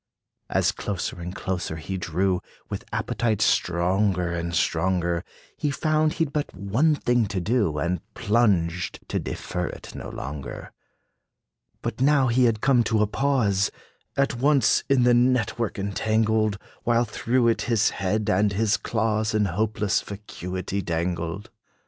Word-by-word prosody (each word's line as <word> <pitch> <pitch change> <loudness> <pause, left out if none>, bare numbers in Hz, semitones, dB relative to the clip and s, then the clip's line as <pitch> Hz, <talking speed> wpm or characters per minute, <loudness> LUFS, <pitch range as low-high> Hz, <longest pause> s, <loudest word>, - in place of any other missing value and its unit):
As - - +2
closer 95 -3 -4
and 90 +2 -6
closer 90 -4 -3
he 80 +4 -5
drew, 90 +1 0 0.3
With - - -4
appetite 110 -1 0
stronger 90 -2 +2
and 85 0 -3
stronger, 85 +1 +1 0.3
He 150 - -1
found 155 +2 +1
he 165 - +1
'd 145 - -10
but 150 -1 -2
one 115 - +2
thing 120 -5 +1
to 100 -1 -2
do, 100 -5 +1
And 85 +3 -1
plunged, 95 -6 +1
to - - 0
defer 90 -1 -3
it - - -9
no - - -7
longer. 70 +1 -7 1.1
But - - -3
now 135 -2 +4
had 115 - 0
he 125 -2 +5
come 120 +3 +3
to 110 -1 +2
a - - +4
pause, 105 -4 +1 0.5
At 140 0 +2
once 140 -1 +3
in 135 -3 +4
the 120 0 +5
net 125 -1 +2
work 115 -3 -1
entangled, 110 +1 +1 0.2
While 120 0 +2
through 120 +3 +1
it 115 - +1
his 110 -3 +3
head 105 +2 -1
and 105 -1 +2
his 110 +1 +2
claws 110 -1 0
In 105 -1 +3
hopeless 105 +2 0
vacuity 95 -2 -5
dangled. 85 +2 -3
105 Hz, 150 wpm, -25 LUFS, 90-120 Hz, 1.1 s, he